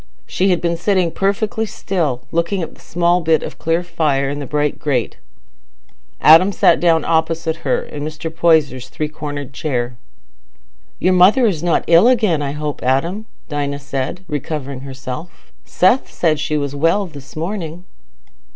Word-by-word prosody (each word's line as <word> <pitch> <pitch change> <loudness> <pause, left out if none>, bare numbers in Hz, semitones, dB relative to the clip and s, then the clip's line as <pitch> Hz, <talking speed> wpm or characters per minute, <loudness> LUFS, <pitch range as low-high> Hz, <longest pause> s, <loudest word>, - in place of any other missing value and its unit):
She 190 +2 0
had 180 -2 +1
been 170 -1 0
sitting 185 -1 +1
perfectly 205 +4 -1
still, 155 -12 -2
looking 170 +3 0
at - - -7
the - - -19
small 175 +1 +1
bit 160 -2 +2
of - - -8
clear 165 +2 0
fire 150 -6 0
in 145 - -4
the 140 - -5
bright 150 +1 -1
grate. 130 -6 -1 1.0
Adam 165 +6 +7
sat 175 -2 +4
down 165 -3 +3
opposite 165 0 0
her, 130 - -1
in 145 -1 -7
Mr. 155 +1 -6
Poyser's 145 -7 +2
three 150 +2 -3
cornered 145 -3 -6
chair. 125 -5 -3 1.0
"Your 185 - +2
mother 195 +8 +5
is 185 -9 0
not 175 -1 +1
ill 170 +7 +6
again, 215 -11 +2
I 140 -1 -2
hope, 150 -1 -4
Adam?" 170 - 0 0.2
Dinah 145 -1 -2
said, 140 +5 -4
recovering 145 -3 -4
herself. 135 +4 -8
"Seth 190 +9 +2
said 155 -3 +1
she 155 0 -1
was 140 -1 -2
well 165 +7 +2
this 145 -5 -12
morning." 170 0 -4
160 Hz, 160 wpm, -18 LUFS, 145-175 Hz, 1.0 s, Adam